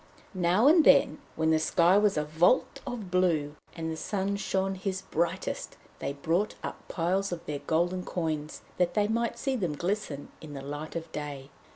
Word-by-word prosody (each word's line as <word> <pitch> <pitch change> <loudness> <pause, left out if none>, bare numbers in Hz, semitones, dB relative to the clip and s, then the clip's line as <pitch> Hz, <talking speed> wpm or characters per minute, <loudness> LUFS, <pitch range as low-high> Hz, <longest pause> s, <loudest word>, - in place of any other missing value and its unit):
Now 185 +4 +3
and 320 +2 +7
then, - - +5 0.2
when 160 0 +2
the 160 - +4
sky 170 +3 +4
was 205 -3 +3
a 150 - +2
vault 175 - +2
of 225 -7 -5
blue, 165 -5 +2 0.2
and 160 -1 -3
the - - -3
sun 195 +4 -2
shone 195 -1 -1
his 190 0 -3
brightest, 170 +1 -2 0.2
they 140 - -3
brought 170 +8 0
up - - -7
piles 185 +3 0
of 175 -2 -5
their 145 -1 -3
golden 175 +3 +1
coins, 155 -4 -3 0.2
that 180 -1 +2
they 205 -1 +3
might 235 +1 0
see 265 +2 -1
them 180 -10 -1
glisten 175 -4 -3
in 150 -2 -9
the 135 - -6
light 145 +3 -6
of 165 -1 -5
day. 145 -2 -6
175 Hz, 185 wpm, -29 LUFS, 155-195 Hz, 0.2 s, and